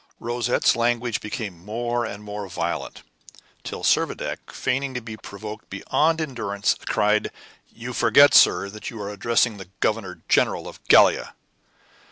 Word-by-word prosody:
Rosette's 120 +1 +1
language 120 -1 0
became 100 -5 -6
more 120 +3 -2
and 105 -1 -8
more 105 -1 -6
violent, - - -4 0.6
till - - -6
Servadac, - - 0
feigning 135 +1 -2
to - - -1
be 115 -2 -8
provoked 105 +2 -9
beyond 155 +11 +1
endurance, 115 -9 -1
cried: 105 +1 +2 0.4
"You 120 +2 -7
forget, 120 +5 +6
sir, 100 - +6
that 110 +3 -7
you 115 -4 -9
are 100 0 -5
addressing 115 +2 +1
the 95 -3 -11
Governor 105 -5 -2
General - - +2
of - - -12
Gallia." - - +5
110 Hz, 140 wpm, -23 LUFS, 105-120 Hz, 0.6 s, forget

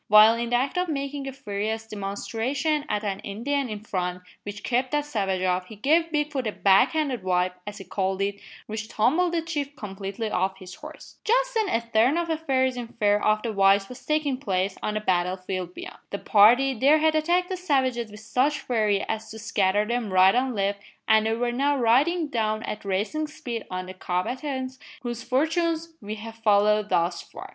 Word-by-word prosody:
While 215 +2 +8
in 235 0 -2
the 245 - +2
act 265 +7 0
of 360 -1 -1
making 280 -1 -3
a - - -3
furious 220 -3 -4
demonstration 230 +9 -2
at 210 - -1
an 195 -2 -2
Indian 255 +6 -2
in 210 -1 -5
front, 180 -3 -3 0.2
which 205 0 -8
kept 255 +1 0
that 295 0 +1
savage 195 -9 -1
off, 180 0 0
he 220 - -10
gave 320 +9 +2
Bigfoot 295 -5 -1
a - - 0
"back 195 +5 +4
handed 285 -8 -1
wipe," 180 0 0
as 205 0 -6
he 195 - -8
called 190 +1 -2
it, 200 0 -2 0.3
which 220 0 -5
tumbled 315 +12 +2
the 335 -1 -1
chief 290 -4 -4
completely 200 +1 -5
off 190 +1 0
his 185 -2 -10
horse. 305 +7 -12
Just - - +2
then 440 -4 +1
a 230 - +1
turn 230 +5 +2
of 340 -1 -1
affairs 265 -5 0
in 240 -1 -4
favour 210 -3 +1
of 215 0 +2
the 230 -2 -2
whites 195 0 +4
was 250 - -10
taking 305 -3 0
place 190 -6 -1
on 210 - -2
the 215 - -1
battle 180 -2 +1
field 185 -1 -5
beyond. - - -9
The 200 - -3
party 240 +8 +5
there 275 +6 +4
had 315 0 +3
attacked 345 +4 +1
the 375 - -1
savages 260 -10 0
with 210 +1 -11
such 265 +7 +1
fury 215 -5 +1
as 220 0 -4
to 220 - -8
scatter 210 -2 +1
them 235 -2 -2
right 185 +1 +6
and 255 0 0
left 200 0 -1 0.3
and 220 0 +4
they 225 - +1
were 240 +1 0
now 280 +4 +1
riding 285 +8 +3
down 220 -4 -1
at 210 - -5
racing 210 +11 -1
speed 240 -7 -6
on 185 0 -4
the 185 - -8
combatants, 260 +9 -3 0.2
whose 240 -1 -4
fortunes 325 +5 0
we 210 +1 -5
have 225 +1 -9
followed 210 -1 +3
thus 170 0 +1
far. - - -11
225 Hz, 205 wpm, -25 LUFS, 200-280 Hz, 0.3 s, While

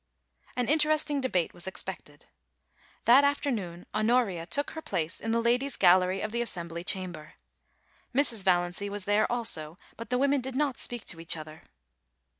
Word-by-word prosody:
* - - -31
An 250 -2 -1
interesting 300 -1 +2
debate 185 -10 0
was 175 +1 -5
expected. 190 - -5 0.8
That 255 +4 +7
afternoon 225 -12 -1
Honoria 215 -6 +1
took 285 +11 -1
her 320 - -7
place 165 - -2
in 225 - -4
the 230 +1 +2
Ladies' 245 +3 +2
Gallery 185 +1 +4
of 215 - -3
the 235 +1 -1
As 240 - -1
sembly 170 -1 -5
Chamber. 180 -5 -2 0.8
Mrs. 245 -5 +1
Valiancy 180 +2 +1
was 200 -1 -5
there 205 +3 +2
also, 180 -10 -1 0.2
but 230 - -8
the 250 - +1
women 280 +1 +2
did 260 +1 -6
not 285 -2 0
speak 240 -2 -5
to 165 - -7
each 165 0 0
other. 155 0 -10
215 Hz, 170 wpm, -28 LUFS, 175-255 Hz, 0.8 s, That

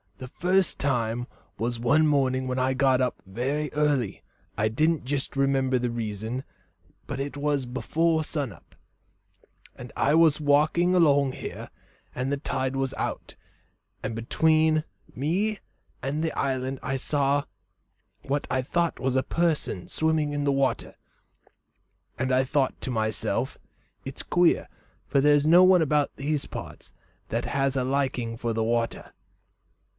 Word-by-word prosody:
The 130 - -8
first 185 +7 +1
time 120 -4 0
it 120 - -7 0.3
was 120 +1 -2
one 145 +7 +3
morning 130 -3 +1
that 130 0 -2
I 130 +1 +1
got 130 -1 +3
up 125 -1 -1
very 135 +10 -2
early 145 -7 0 0.3
I 110 - +2
don't 155 +8 +1
jist 135 +2 -2
remember 135 -1 +2
the 125 0 -1
reason, 115 +2 -4 0.6
but 140 -2 -4
it 140 +1 -4
was 145 -2 0
before 160 +6 0
sun 145 -5 -3
up, - - -18 1.0
and - - -10
I 145 - +2
was 160 -2 +5
walking 155 +5 +3
along 140 -6 +4
here, - - -7 0.5
and 130 +2 -2
the 140 - 0
tide 130 -2 -2
was 135 -1 -1
out, - - -4 0.7
and 115 - -3
between 155 +6 +2 0.3
me 185 - 0 0.4
and 145 +4 -1
the 160 - 0
island 130 -1 -1
I 135 0 -1
saw 140 +1 +1 0.8
what 140 +1 -1
I 130 - +1
thought 170 +6 -1
was 130 +1 -1
a 130 - +2
person 160 - -1
swimming 155 -2 0
in 145 0 -1
the 140 - +2
water, 135 -1 0 1.2
and 130 +1 -1
I 130 +1 +4
thought 135 0 0
to 130 - -3
myself, 110 -2 -1 0.5
'It's 135 - -7
queer, 175 -1 +2 0.4
for 140 - +2
there's 145 +1 +4
no 175 +3 +7
one 185 -1 +6
about 150 -2 +1
these 145 +1 -2
parts - - -9 0.4
that 115 +2 -1
has 135 -1 0
a 130 - +1
liking 130 -4 -1
for 115 0 -2
the 110 0 0
water.' 115 0 -2
135 Hz, 150 wpm, -26 LUFS, 130-150 Hz, 1.2 s, no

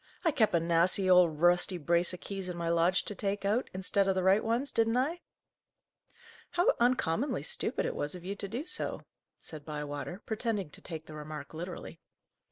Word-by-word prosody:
"I 325 - +4
kep' 220 -9 +2
a - - +4
nasty 170 +3 +3
old, 180 -4 +5
rusty 175 +1 +4
brace 170 +2 +2
o' 180 - -6
keys 195 -2 -5
in 175 - -5
my 170 -1 -2
lodge 170 +2 +2
to - - -2
take 200 +1 -3
out, 215 +5 +1
instead 190 +1 +1
o' 195 - +3
the 185 -1 -1
right 190 +3 +4
ones, 235 +5 0
didn't 225 +1 +2
I?" 310 +7 0 1.3
"How 350 +1 +4
uncommonly 245 - +1
stupid 485 - -2
it - - -2
was 145 +4 -2
of 180 -1 -10
you 200 +2 -3
to 200 - -2
do 240 +9 -4
so!" 360 - -2 0.4
said 155 -2 -10
Bywater, 150 +4 -5
pretending 220 -6 -2
to - - -11
take 160 -2 -7
the 155 - -11
remark 150 0 -8
literally. 170 0 -7
185 Hz, 190 wpm, -31 LUFS, 165-220 Hz, 1.3 s, old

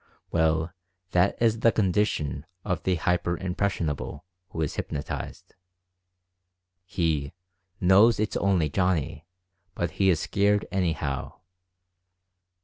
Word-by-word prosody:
Well, 80 0 +1 0.4
that 90 +2 +2
is 115 -1 +2
the 115 - +5
condition 90 -8 0 0.2
of 90 -4 -1
the 95 - +1
li - - 0
hyper 85 +1 0
impressionable" 90 -5 -2 0.2
who 80 - -4
is 75 - -2
hypnotized. 70 0 -5 1.3
He 80 -6 -1 0.5
"knows 100 +5 +5
it's 105 0 -1
only 95 -5 +2
Johnny, 85 -2 -1 0.5
but 85 -2 -1
he 95 +4 +2
is 85 -4 +3
scared 100 +3 +1
anyhow!" 80 -8 -1
90 Hz, 110 wpm, -26 LUFS, 80-100 Hz, 1.3 s, the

